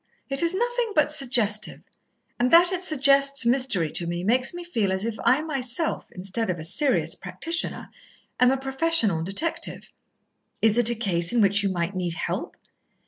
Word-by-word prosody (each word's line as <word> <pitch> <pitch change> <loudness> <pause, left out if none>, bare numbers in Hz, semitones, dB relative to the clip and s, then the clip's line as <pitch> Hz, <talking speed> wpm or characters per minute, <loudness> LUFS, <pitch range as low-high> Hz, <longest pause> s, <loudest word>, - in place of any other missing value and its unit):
"It 275 0 +1
is 340 +2 +3
nothing 480 +1 -2
but 300 -1 +2
suggestive, 240 -7 0 0.6
and 245 +1 +2
that 345 +4 +6
it 370 -1 -2
suggests 275 -4 +2
mystery 235 - 0
to 170 - -1
me 175 +1 -4
makes 250 +6 +2
me 350 0 -8
feel 225 - -2
as 190 +2 -1
if 230 -1 -3
I 280 +4 +2
myself, 275 0 -1
instead 195 +4 -3
of 180 - -2
a 160 - -8
serious 265 - +1
practitioner, 330 0 -3 0.5
am 250 - +5
a 270 - +1
professional 270 - +2
detective." 195 - -2 0.7
"Is 225 +1 +2
it 240 -1 +4
a 235 - -1
case 180 -6 -1
in 240 - 0
which 200 -1 +3
you 200 - -1
might 175 +1 -3
need 175 -2 -3
help?" - - -5
245 Hz, 175 wpm, -24 LUFS, 195-300 Hz, 0.7 s, that